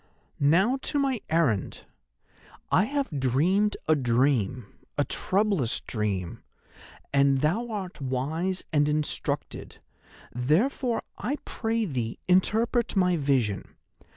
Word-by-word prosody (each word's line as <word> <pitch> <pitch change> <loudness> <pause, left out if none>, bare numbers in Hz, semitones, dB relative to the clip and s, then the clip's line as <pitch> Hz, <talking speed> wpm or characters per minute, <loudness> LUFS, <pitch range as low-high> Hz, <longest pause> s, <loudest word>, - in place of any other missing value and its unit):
"'Now 190 - +3
to - - -1
my 270 -4 0
errand. 155 - +1 0.9
I 185 - +4
have 275 - -2
dreamed 175 - +2
a 155 - +5
dream, 125 -3 +1 0.3
a 145 - +3
troublous 190 - 0
dream, 100 -6 -3 0.7
and 140 -1 +4
thou 190 +11 +1
art 195 -7 -5
wise 155 +8 -2
and 145 0 +3
instructed, 150 0 -2 0.5
therefore 220 - +1 0.2
I 280 - -1
pray 225 -1 -1
thee 125 - -3
interpret 220 +6 +2
my 180 -2 +3
vision. 130 - 0
155 Hz, 105 wpm, -27 LUFS, 130-210 Hz, 0.9 s, a